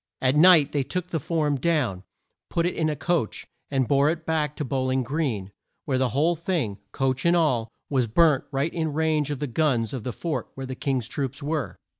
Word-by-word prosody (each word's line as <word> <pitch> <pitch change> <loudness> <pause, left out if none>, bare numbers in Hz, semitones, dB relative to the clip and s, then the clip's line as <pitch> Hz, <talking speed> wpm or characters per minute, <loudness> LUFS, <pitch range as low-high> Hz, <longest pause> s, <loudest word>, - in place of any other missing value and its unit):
At 130 +1 +2
night 155 -3 +7
they 145 - +1
took 180 +6 -4
the 160 - 0
form 150 -1 0
down, 135 - 0 0.5
put 170 - 0
it 180 - 0
in 160 -1 0
a 150 - -1
coach, 165 -6 -1 0.2
and 135 -3 +1
bore 140 +1 +4
it 160 0 -3
back 150 -2 0
to 150 - -3
Bow 130 0 -1
ling 130 0 +1
Green, 120 -8 -2 0.3
where 130 -3 0
the 130 -1 +2
whole 155 +7 +2
thing 155 - -2
coach 135 -2 -1
and 170 +1 +4
all 125 -9 +2 0.2
was 130 -4 +1
burnt 150 +4 +3
right 140 +4 -1
in 160 -3 -2
range 155 -1 +1
of 145 - -2
the 145 - -2
guns 125 -4 0
of 130 -5 -4
the 125 - -3
fort 160 +6 -4
where 135 - -5
the 130 - -5
King's 130 -3 -1
troops 140 +1 -4
were. 150 -2 -2
145 Hz, 215 wpm, -25 LUFS, 130-160 Hz, 0.5 s, night